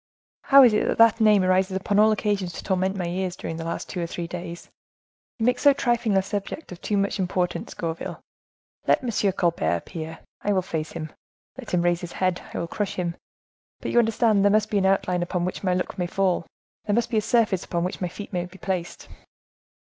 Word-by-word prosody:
"How 275 0 +8
is 240 -4 +6
it 210 - +2
that - - 0
that 230 0 +5
name 210 -3 +5
rises 185 +1 +2
upon 200 +2 +1
all 215 +1 +6
occasions 205 -4 -1
to - - -7
torment 190 0 0
my 180 - -2
ears, 180 +1 -2
during 165 - -5
the 165 - -5
last 165 +1 -4
two 180 - -4
or 170 - -2
three 175 0 -5
days? 170 0 -7 0.7
You 225 - -1
make 250 0 +2
so 285 -1 +6
trifling 235 -6 +1
a 190 - +3
subject 205 +9 -5
of 180 - -9
too 205 - -1
much 200 +1 0
importance, 180 -1 -2
Gourville. 165 -1 -4 0.7
Let - - +3
M. 215 -5 +1
Colbert 175 - +1
appear, 160 - -7 0.2
I 205 - +1
will 185 -1 +1
face 160 -3 -4
him; 155 -2 -6 0.4
let 260 -3 -9
him 175 -1 +1
raise 175 0 +1
his 175 -1 -7
head, 185 -1 0
I - - -5
will 170 - -2
crush 200 +3 -3
him; 175 -2 -2 0.6
but - - -4
you 240 - +4
understand, 220 -2 +3
there 205 - +5
must 215 +1 +2
be 205 - +2
an 190 - +2
outline 180 -2 +1
upon 175 0 -1
which 185 - -4
my 185 -2 +2
look 180 +1 -3
may 175 - 0
fall, 185 -2 0 0.4
there 205 - +1
must 235 0 0
be 225 - +1
a - - +3
surface 220 -4 +2
upon 170 -1 -2
which 180 - -4
my 180 - 0
feet 200 +4 -9
may 175 -1 -1
be 185 +1 -15
placed." 185 -2 -4
190 Hz, 225 wpm, -25 LUFS, 175-210 Hz, 0.7 s, How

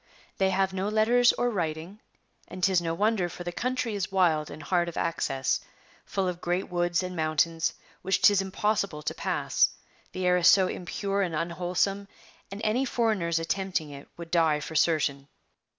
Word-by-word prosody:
' - - -31
They 190 0 +3
have 190 0 +1
no 190 +2 -1
letters 235 +3 +4
or 245 0 0
writing; 170 +1 -4 0.5
and 185 - -9
'tis 185 -2 +4
no 165 -1 -2
wonder, 205 -2 +1
for 175 +1 -8
the 175 - -4
country 250 +3 -2
is 195 -1 -3
wild 165 -6 +2
and 150 +1 -9
hard 175 +2 +1
of 170 - -9
access, 135 -5 0 0.5
full 195 -2 -1
of 180 -1 -4
great 175 +2 -1
woods 175 0 0
and 180 0 -5
mountains 160 +1 0 0.3
which 190 +1 +1
'tis 205 -2 +5
impossible 195 -4 -1
to - - -2
pass, - - +1 0.4
the 185 0 -3
air 180 0 +4
is 180 0 +4
so 190 -1 +6
impure 195 +3 -3
and 175 -4 -1
unwholesome; 180 +4 -1 0.4
and 195 +2 -7
any 225 +5 +1
foreigners 215 -10 0
attempting 165 -2 -2
it 140 0 -10
would 170 -1 -9
die 160 -3 +3
for 150 - -7
certain. 150 -3 +1
180 Hz, 180 wpm, -27 LUFS, 165-195 Hz, 0.5 s, so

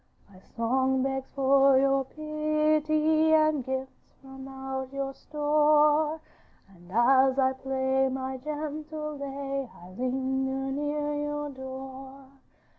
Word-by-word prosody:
'My 185 - -15
song 260 +5 0
begs 270 0 -3
for 275 0 +5
your 275 0 +3
pity, 310 +1 +1
And 310 -3 +3
gifts 265 +1 -6
from 265 0 -11
out 265 -1 -6
your 275 0 -3
store, 300 +1 +2 0.5
And 180 -2 -18
as 260 +4 +4
I 265 -1 +3
play 265 0 0
my 260 0 -4
gentle 305 +2 -5
lay 275 -1 -4
I 175 - -13
linger 265 +3 -2
near 295 +1 -2
your 295 0 -3
door. 265 0 -9
270 Hz, 115 wpm, -28 LUFS, 265-300 Hz, 0.5 s, for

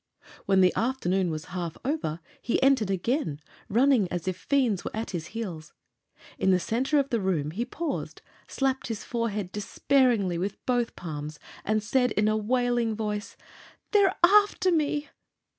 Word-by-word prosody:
When 195 -1 +4
the 180 -1 +5
afternoon 195 -7 0
was 155 -1 -4
half 170 -3 -4
over 255 - -2 0.2
he 240 - 0
entered 265 -7 +4
again, 195 - -1 0.3
running 240 -3 +3
as 175 0 -3
if 185 - 0
fiends 250 -8 +1
were - - -3
at 220 +1 -3
his 170 -3 -4
heels. 175 -8 -6 0.7
In - - +2
the 185 -1 +4
center 255 - 0
of 275 -1 +1
the 235 - +2
room 165 -6 0
he 225 +8 -2
paused, 315 +5 -4 0.2
slapped 265 -1 -1
his 225 -2 -4
forehead 215 -6 -2
despairingly 210 -3 +1
with 200 +3 -3
both 245 -2 0
palms, 150 -3 -6 0.3
and 215 0 0
said 250 +2 +2
in 210 0 +2
a 215 - +2
wailing 240 0 +1
voice: 210 -1 -4 0.5
"They're 400 -3 +4
after 395 0 +5
me!" 295 -2 0
220 Hz, 160 wpm, -27 LUFS, 185-260 Hz, 0.7 s, the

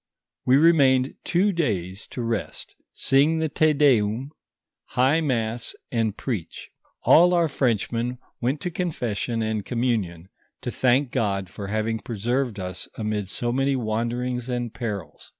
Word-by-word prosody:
We 130 +2 +6
remained 140 -5 +4
two 190 +4 +2
days 100 - -2
to 125 - -5
rest, 115 -2 -3 0.2
sing 145 +4 +3
the 160 -1 0
Te 155 +2 +3
Deum, 130 -3 +2 0.5
high 135 +6 +2
mass, 115 -5 -1 0.2
and 110 -3 0
preach. 110 -11 -5 0.3
All 175 +2 +6
our 170 -1 +3
Frenchmen 120 -2 0 0.2
went 130 +5 0
to 180 - -2
confession 120 - -2
and 110 -1 -1
communion, 105 -9 -1 0.3
to - - -3
thank 130 +1 +2
God 100 -4 -1
for 100 - -6
having 110 +2 -1
preserved 120 +1 -2
us 90 -1 -5
amid 105 -3 -2
so 120 +4 -2
many 135 +2 +1
wanderings 120 +2 -2
and 120 -2 -2
perils. 105 -6 -6
120 Hz, 135 wpm, -24 LUFS, 110-135 Hz, 0.5 s, We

